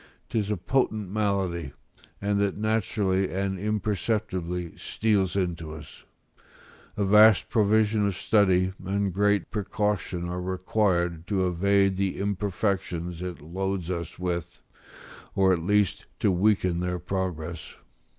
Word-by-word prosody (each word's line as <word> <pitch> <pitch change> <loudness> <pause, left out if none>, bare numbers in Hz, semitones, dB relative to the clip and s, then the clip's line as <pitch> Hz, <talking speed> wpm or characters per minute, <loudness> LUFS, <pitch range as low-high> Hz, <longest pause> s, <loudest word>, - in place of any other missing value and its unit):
'Tis 105 -3 -1
a 105 - 0
potent 110 -1 0
malady, 95 -7 -1 0.5
and 100 0 0
that 100 -1 0
naturally 105 -3 0
and 95 0 -2
imperceptibly 100 -4 -2
steals 100 -5 0
into 85 -5 -2
us; 75 -1 -12 0.9
a 100 - +1
vast 105 +1 +6
provision 110 -1 +3
of 100 - -2
study 95 -3 +3
and 100 0 -1
great 100 0 +1
precaution 105 -4 -2
are 90 +1 -3
required 90 -2 0
to 95 -3 +1
evade 95 +2 +2
the 95 -1 -1
imperfections 95 -4 -2
it 90 -4 -5
loads 95 +2 -3
us 85 -3 -4
with, 85 -1 -4 0.7
or 95 -1 +4
at 90 - 0
least 105 +2 +1
to 100 - +2
weaken 95 -2 +2
their 90 0 -1
progress. 85 -3 -4
95 Hz, 120 wpm, -26 LUFS, 90-105 Hz, 0.9 s, vast